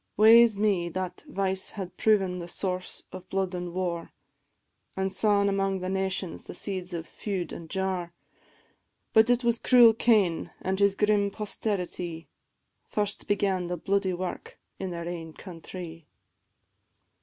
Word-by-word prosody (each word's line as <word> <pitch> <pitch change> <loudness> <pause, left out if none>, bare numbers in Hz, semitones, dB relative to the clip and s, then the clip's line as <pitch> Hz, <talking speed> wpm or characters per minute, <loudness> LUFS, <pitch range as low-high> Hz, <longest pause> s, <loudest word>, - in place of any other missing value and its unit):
Wae 225 +3 +9
's 225 -4 +2
me, 200 -5 +1
that 185 +1 -5
vice 190 -1 -1
had 185 -2 -5
proven 195 -4 +2
the 170 - -6
source 185 0 -3
of 185 0 -10
blood 190 -1 -1
an' 175 -1 -4
war, 175 -2 -3 0.9
An' 190 0 0
sawn 205 -1 +3
amang 195 -1 +1
the 185 0 -4
nations 190 -2 -2
the - - -8
seeds 185 -2 -4
of 165 -2 -4
feud 190 -3 -4
an' 165 - -8
jar: 185 -1 -2 1.0
But 220 +1 +6
it 245 +1 +3
was 235 -1 +2
cruel 240 -3 +7
Cain, 210 -7 +2
an' 190 +1 -1
his 200 0 +3
grim 210 -1 +2
posterity, 180 -5 -3 0.6
First 205 -1 -2
began 195 -3 +1
the 175 0 -3
bloody 195 +2 0
wark 180 +1 -5 0.2
in 190 - -3
their 170 -1 -5
ain 165 -2 -6
countrie. 170 -2 -9
190 Hz, 145 wpm, -28 LUFS, 180-205 Hz, 1.0 s, Wae